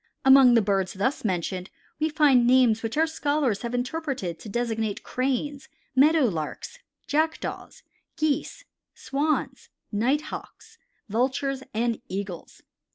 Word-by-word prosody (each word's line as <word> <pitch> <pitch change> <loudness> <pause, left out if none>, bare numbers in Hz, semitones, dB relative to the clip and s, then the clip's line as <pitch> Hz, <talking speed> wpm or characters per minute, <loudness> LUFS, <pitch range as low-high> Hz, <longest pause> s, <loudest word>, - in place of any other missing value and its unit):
Among 265 -2 +8
the 230 - +4
birds 195 -2 0
thus 255 +9 -1
mentioned 185 -1 -2 0.3
we 310 +1 +1
find 280 -6 +4
names 245 -3 +4
which 225 +4 -4
our 320 - +4
scholars 290 -8 0
have 235 0 -3
interpreted 250 - -3
to 215 - -9
designate 225 -2 -2
Cranes, 270 +2 -2 0.3
Meadow 305 +4 +5
Larks, 195 - -4 0.3
Jackdaws, 315 +2 -2 0.3
Geese, 310 - -1 0.3
Swans, 295 +3 -2 0.2
Nighthawks, 265 +9 -3 0.3
Vultures, 265 +5 -1
and 230 0 0
Eagles. 190 -3 -6
250 Hz, 115 wpm, -26 LUFS, 215-290 Hz, 0.3 s, Among